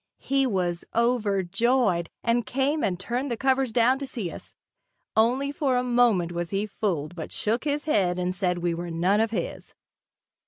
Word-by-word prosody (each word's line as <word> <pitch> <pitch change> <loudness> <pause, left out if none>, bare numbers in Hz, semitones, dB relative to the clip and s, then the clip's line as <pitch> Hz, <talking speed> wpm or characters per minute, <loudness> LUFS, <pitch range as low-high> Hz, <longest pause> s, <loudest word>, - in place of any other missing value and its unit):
He 275 -1 +2
was 180 -5 -1
overjoyed, 210 -3 +1
and 235 +1 +2
came 275 +6 0
and 180 -2 0
turned 245 +7 -2
the 235 - -2
covers 265 -1 +1
down 245 +3 +3
to 275 - -4
see 205 -10 -4
us. - - -11 0.6
Only 250 +6 +2
for 275 -3 0
a 250 - +1
moment 240 -8 +3
was 175 -1 -3
he 200 +1 -1
fooled 180 -7 -2
but 160 - -6
shook 230 +6 -1
his 290 0 -1
head 190 - +2
and 180 0 -1
said 180 -1 0
we 175 -1 -1
were 170 +1 -5
none 175 +5 +2
of 225 0 +2
his. 200 -6 -5
220 Hz, 180 wpm, -26 LUFS, 180-250 Hz, 0.6 s, down